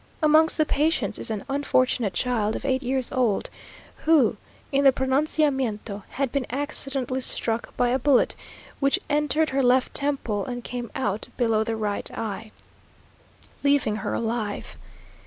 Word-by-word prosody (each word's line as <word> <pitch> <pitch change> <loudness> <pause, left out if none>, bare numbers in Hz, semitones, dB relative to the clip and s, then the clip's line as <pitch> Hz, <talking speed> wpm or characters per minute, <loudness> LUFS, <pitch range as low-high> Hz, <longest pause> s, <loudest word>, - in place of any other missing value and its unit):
Amongst 310 +1 +5
the 310 - +3
patients 290 -9 0
is - - -5
an 215 -3 -4
unfortunate 255 -6 +1
child 225 -3 0
of - - -6
eight 265 -1 +1
years 260 -1 0
old, 240 -6 0 0.5
who 300 -9 +3 0.4
in 280 0 +2
the 270 - +7
pronunciamiento 265 -6 0 0.2
had 270 -2 0
been 280 -3 -1
accidentally 270 -2 0
struck 230 -2 -1
by 245 -1 +2
a 255 +2 +1
bullet, 270 0 +3 0.4
which 275 -1 +3
entered 300 +1 +2
her 275 +1 +1
left 255 0 +3
temple 270 -8 0
and 245 +1 -5
came 240 -1 -5
out 215 -6 -2
below 225 -3 +2
the 225 0 -2
right 210 -2 -2
eye, 215 0 -5 1.1
leaving 280 -7 +2
her - - -3
alive. 225 -3 -3
255 Hz, 145 wpm, -25 LUFS, 225-280 Hz, 1.1 s, the